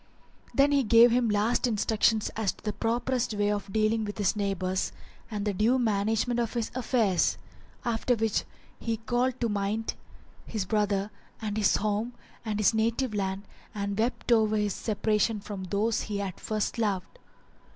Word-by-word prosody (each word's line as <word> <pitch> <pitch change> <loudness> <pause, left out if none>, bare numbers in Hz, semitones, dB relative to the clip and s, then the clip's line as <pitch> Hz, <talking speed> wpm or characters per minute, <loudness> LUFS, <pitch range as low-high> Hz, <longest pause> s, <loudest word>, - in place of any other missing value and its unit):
Then 280 +1 +4
he 285 -1 +4
gave 235 0 +6
him 245 0 +3
his 210 -2 +1
last 230 +5 +2
instructions 220 0 +2
as 215 -4 -1
to - - -21
the 210 - -2
properest 240 0 -1
way 205 0 +1
of 205 -1 -3
dealing 220 +1 +2
with 205 0 -5
his 205 -2 +1
neighbours 190 -2 -1 0.4
and 210 -2 -3
the 205 - 0
due 220 +7 +3
management 225 +1 +1
of 235 0 -2
his 230 -2 -1
affairs; 225 -8 +1 0.5
after 235 +1 +1
which 220 -2 0 0.4
he 230 -1 -2
called 240 +3 0
to 235 - +2
mind 210 +1 -1 0.5
his 215 -4 -2
brother 205 0 0 0.3
and 210 -2 -3
his 215 -2 +3
home 215 +3 -1 0.3
and 215 -2 -2
his 215 +1 +3
native 230 +2 0
land 195 -1 -2 0.3
and 200 0 -2
wept 240 +2 -1
over 220 -2 +4
his 210 -2 0
separation 215 0 0
from 200 -2 -6
those 205 +4 0
he 210 -1 -3
had 195 -3 -4
first 215 +2 -2
loved. 205 - -2
215 Hz, 170 wpm, -28 LUFS, 205-230 Hz, 0.5 s, gave